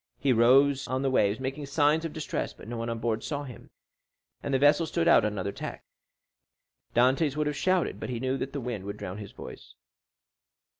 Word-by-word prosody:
He 135 Hz, -2 st, +2 dB
rose 135 Hz, +4 st, +4 dB
on 130 Hz, +1 st, -1 dB
the 135 Hz, -, +1 dB
waves, 105 Hz, -4 st, +2 dB
making 135 Hz, +2 st, -4 dB
signs 150 Hz, +3 st, +2 dB
of 165 Hz, -, -3 dB
distress; 155 Hz, -1 st, -4 dB
but -, -, -14 dB
no 120 Hz, -, -5 dB
one 115 Hz, 0 st, -3 dB
on 115 Hz, -, -2 dB
board 115 Hz, -1 st, -2 dB
saw 145 Hz, -1 st, -3 dB
him, 125 Hz, -5 st, -11 dB, 0.7 s
and -, -, -4 dB
the 135 Hz, -, +3 dB
vessel 145 Hz, +4 st, +4 dB
stood 170 Hz, 0 st, 0 dB
on -, -, +6 dB
another 100 Hz, -2 st, -2 dB
tack. -, -, -7 dB, 1.1 s
Dantès 130 Hz, +4 st, +3 dB
would 150 Hz, -, +1 dB
have 150 Hz, 0 st, -1 dB
shouted, 185 Hz, +2 st, 0 dB
but -, -, -5 dB
he 120 Hz, -2 st, -3 dB
knew 130 Hz, +1 st, -1 dB
that 135 Hz, -, -3 dB
the 140 Hz, -, -4 dB
wind 120 Hz, -5 st, -4 dB
would 100 Hz, -, -5 dB
drown 90 Hz, +3 st, -6 dB
his 100 Hz, -2 st, -8 dB
voice. -, -, -11 dB
130 Hz, 205 wpm, -28 LUFS, 115-145 Hz, 1.1 s, on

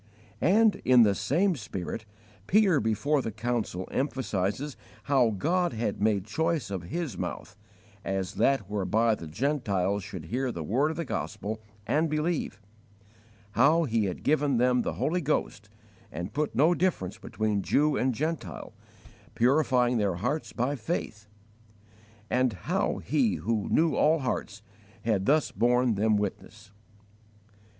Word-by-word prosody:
And, 215 Hz, +4 st, +4 dB
in 125 Hz, -2 st, +6 dB
the 105 Hz, -2 st, +4 dB
same 175 Hz, -, +1 dB
spirit, 110 Hz, -, -6 dB, 0.4 s
Peter 195 Hz, -6 st, +4 dB
before 135 Hz, +7 st, +1 dB
the 115 Hz, -, -4 dB
council 110 Hz, -4 st, -3 dB
emphasizes 130 Hz, 0 st, -2 dB, 0.3 s
how 130 Hz, -3 st, +3 dB
God 170 Hz, -, 0 dB
had 110 Hz, -3 st, -2 dB
made 105 Hz, -3 st, +2 dB
choice 160 Hz, +2 st, -1 dB
of 95 Hz, -3 st, -4 dB
his 165 Hz, -, -4 dB
mouth, 95 Hz, -, -5 dB, 0.5 s
as 95 Hz, -1 st, -2 dB
that 135 Hz, -3 st, +2 dB
whereby 105 Hz, +3 st, +1 dB
the 85 Hz, -6 st, -6 dB
Gentiles 100 Hz, -, -1 dB
should 95 Hz, -4 st, -8 dB
hear 125 Hz, +8 st, -2 dB
the 85 Hz, -7 st, -5 dB
word 130 Hz, -, +1 dB
of 160 Hz, -, -5 dB
the 170 Hz, -, -2 dB
Gospel 110 Hz, +1 st, -4 dB, 0.2 s
and 155 Hz, +2 st, +1 dB
believe; 155 Hz, -, -1 dB, 0.9 s
how 145 Hz, +10 st, +4 dB
He 115 Hz, -7 st, +1 dB
had 95 Hz, -, -4 dB
given 145 Hz, -3 st, +2 dB
them 125 Hz, +1 st, +3 dB
the -, -, -2 dB
Holy 175 Hz, +3 st, 0 dB
Ghost 120 Hz, -8 st, -2 dB, 0.4 s
and 85 Hz, +4 st, -6 dB
put 150 Hz, 0 st, -1 dB
no 155 Hz, +6 st, +4 dB
difference 170 Hz, -, -1 dB
between 105 Hz, -2 st, -1 dB
Jew 145 Hz, +9 st, +2 dB
and 130 Hz, 0 st, +1 dB
Gentile, 130 Hz, -, -4 dB, 0.6 s
purifying 125 Hz, -2 st, +3 dB
their 100 Hz, -4 st, +1 dB
hearts 125 Hz, -, -2 dB
by 125 Hz, +4 st, -1 dB
faith; 110 Hz, -5 st, -4 dB, 1.0 s
and 125 Hz, -1 st, +1 dB
how 90 Hz, -, -1 dB
He 130 Hz, -9 st, +1 dB
who 105 Hz, +6 st, -2 dB
knew 160 Hz, -1 st, +3 dB
all 155 Hz, +2 st, +4 dB
hearts 110 Hz, -7 st, -3 dB, 0.4 s
had 105 Hz, -4 st, +1 dB
thus 155 Hz, +2 st, +3 dB
borne 125 Hz, 0 st, +2 dB
them 110 Hz, +2 st, +2 dB
witness. 105 Hz, +1 st, -5 dB
120 Hz, 140 wpm, -28 LUFS, 105-150 Hz, 1.0 s, in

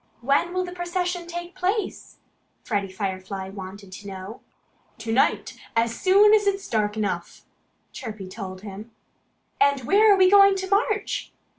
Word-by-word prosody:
"When 280 Hz, +7 st, +2 dB
will 365 Hz, 0 st, -1 dB
the 355 Hz, -, -7 dB
procession 355 Hz, 0 st, -3 dB
take 345 Hz, +1 st, -6 dB
place?" 380 Hz, +3 st, -3 dB, 0.5 s
Freddie 200 Hz, -3 st, -2 dB
Firefly 190 Hz, 0 st, -4 dB
wanted 195 Hz, 0 st, -9 dB
to 200 Hz, +2 st, -10 dB
know. 195 Hz, +3 st, -8 dB, 0.6 s
"To 225 Hz, 0 st, -5 dB
night, 255 Hz, -, +1 dB, 0.2 s
as 230 Hz, 0 st, +2 dB
soon 405 Hz, +3 st, +6 dB
as 420 Hz, -1 st, +4 dB
it's 390 Hz, -1 st, 0 dB
dark 210 Hz, -1 st, 0 dB
enough!" 185 Hz, -5 st, -3 dB, 0.5 s
Chirpy 215 Hz, -7 st, -7 dB
told 185 Hz, 0 st, -7 dB
him. 210 Hz, +2 st, -9 dB, 0.7 s
"And 280 Hz, -1 st, +4 dB
where 415 Hz, -, +5 dB
are 400 Hz, -, +6 dB
we 375 Hz, -1 st, +6 dB
going 395 Hz, 0 st, +7 dB
to 380 Hz, 0 st, -4 dB
march?" 420 Hz, +1 st, 0 dB
260 Hz, 150 wpm, -24 LUFS, -, 0.7 s, going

